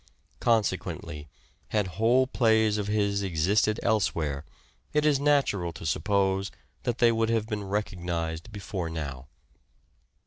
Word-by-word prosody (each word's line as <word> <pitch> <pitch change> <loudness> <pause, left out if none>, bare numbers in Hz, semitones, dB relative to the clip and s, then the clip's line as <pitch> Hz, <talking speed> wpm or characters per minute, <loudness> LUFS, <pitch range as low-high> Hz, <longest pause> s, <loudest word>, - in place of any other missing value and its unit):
Con 115 -2 +4
sequently, 75 -5 -5 0.4
had 105 -2 +1 0.2
whole 125 +3 +5
plays 110 -4 +2
of 105 - -2
his 100 -1 +1
existed 100 +4 +1
elsewhere 80 -10 0 0.5
it 150 0 +2
is 145 -3 +4
natural 140 -12 +2
to 80 - -9
suppose 95 +2 +1 0.4
that 120 -1 0
they 120 -1 +5
would 115 0 +1
have 115 -2 +1
been 105 -2 -3
recognized 90 -3 -3
before 100 -4 -4
now. 70 -5 -5
105 Hz, 130 wpm, -27 LUFS, 85-115 Hz, 0.5 s, whole